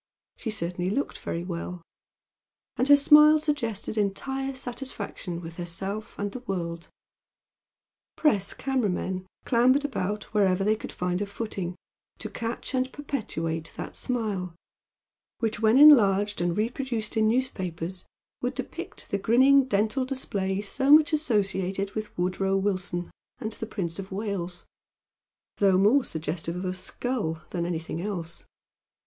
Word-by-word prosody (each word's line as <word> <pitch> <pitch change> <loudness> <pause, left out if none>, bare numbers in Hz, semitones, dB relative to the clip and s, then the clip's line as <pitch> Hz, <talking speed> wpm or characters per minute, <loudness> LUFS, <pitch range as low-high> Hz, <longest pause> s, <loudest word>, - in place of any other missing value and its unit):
She 225 - -5
certainly 180 -3 -2
looked 275 +8 -2
very 170 - -3
well, 175 0 -5 0.9
and 255 - +1
her 285 - +9
smile 300 +2 +7
suggested 235 -9 -2
entire 270 +7 -2
satisfaction 235 -9 -5
with 165 -1 -9
herself 190 +5 -4
and 205 0 -2
the 255 - -6
world. 170 -7 -4 1.3
Press 210 -11 +2
camera 265 -6 0
men 185 0 -3 0.2
clambered 255 +4 +4
about 210 -6 -2
wherever 195 -3 +3
they 215 +2 +3
could - - -7
find 180 +1 -2
a 205 - -1
footing, 200 -4 -4 0.4
to - - -7
catch 230 +4 -4
and 260 0 0
perpetuate 165 - -3
that - - -6
smile, 205 -8 -2 0.8
which 220 -3 -1
when 225 +2 +4
enlarged 205 -10 +7
and 175 +1 0
reproduced 230 0 -2
in 220 -1 +3
newspapers 185 -8 -2 0.3
would 250 +1 -2
depict 300 +7 -6
the 200 - 0
grinning 260 +6 +5
dental 220 +3 +1
display 200 -7 -2
so 265 +7 -1
much 310 +1 +7
associated 195 - 0
with 215 0 -4
Woodrow 190 +2 +1
Wilson 185 -3 -2 0.3
and 220 - -4
the 225 - -5
Prince 180 -5 -4
of 195 0 -7
Wales, 190 -3 -4 0.9
though 195 -2 +4
more 220 +8 +5
suggestive 160 0 -4
of 180 +1 -4
a 185 - -1
skull 185 -3 -3
than 170 -2 -1
anything 165 -1 -3
else. 175 -4 -5
205 Hz, 135 wpm, -27 LUFS, 180-250 Hz, 1.3 s, her